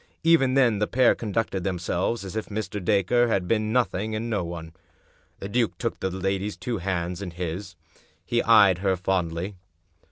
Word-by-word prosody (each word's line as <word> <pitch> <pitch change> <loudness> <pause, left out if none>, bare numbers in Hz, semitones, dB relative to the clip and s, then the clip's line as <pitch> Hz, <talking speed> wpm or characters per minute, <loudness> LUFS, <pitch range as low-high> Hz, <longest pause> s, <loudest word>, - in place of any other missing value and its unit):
Even 160 -6 +4
then 120 -6 +4
the 105 - +1
pair 130 0 +4
conducted 105 -3 -2
themselves 90 +3 -1
as 95 - -7
if 110 - -3
Mr. 105 -2 -4
Dacre 105 +5 +3
had 95 -5 0
been 110 0 +1
nothing 110 -3 0
and 115 +2 -3
no 100 -5 0
one. 85 -1 -7 0.6
The 100 - -6
duke 115 +2 0
took 115 - -3
the 95 - -1
lady's 95 +2 -2
two 120 -4 -3
hands 90 0 -2
in 100 - -4
his. 90 +2 -5 0.5
He 120 0 +1
eyed 100 -6 +6
her 95 -1 +1
fondly. 90 0 -2
100 Hz, 170 wpm, -25 LUFS, 90-115 Hz, 0.6 s, eyed